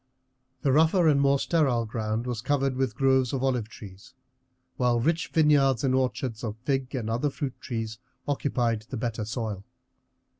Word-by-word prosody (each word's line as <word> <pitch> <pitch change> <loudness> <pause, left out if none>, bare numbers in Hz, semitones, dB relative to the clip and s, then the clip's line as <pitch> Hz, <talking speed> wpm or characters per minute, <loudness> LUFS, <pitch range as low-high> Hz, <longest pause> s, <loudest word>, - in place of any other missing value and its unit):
The 135 - +3
rougher 160 +4 +4
and 140 -2 +4
more 140 0 +4
sterile 135 -7 +1
ground 110 +1 -3
was 120 -3 -3
covered 135 0 0
with 130 -4 -1
groves 130 -1 +2
of 135 -1 -1
olive 125 -5 0
trees, 100 +2 -13 0.6
while 120 -2 +2
rich 165 +7 0
vineyards 145 -6 +3
and 130 -2 +2
orchards 130 -3 -1
of 110 -2 -4
fig 135 0 -1
and 120 -4 -3
other 120 +6 0
fruit 135 -1 -5
trees 110 -2 -4 0.3
occupied 120 -6 -1
the 130 - -4
better 115 -2 -3
soil. 110 -4 -4
130 Hz, 160 wpm, -27 LUFS, 115-140 Hz, 0.6 s, rougher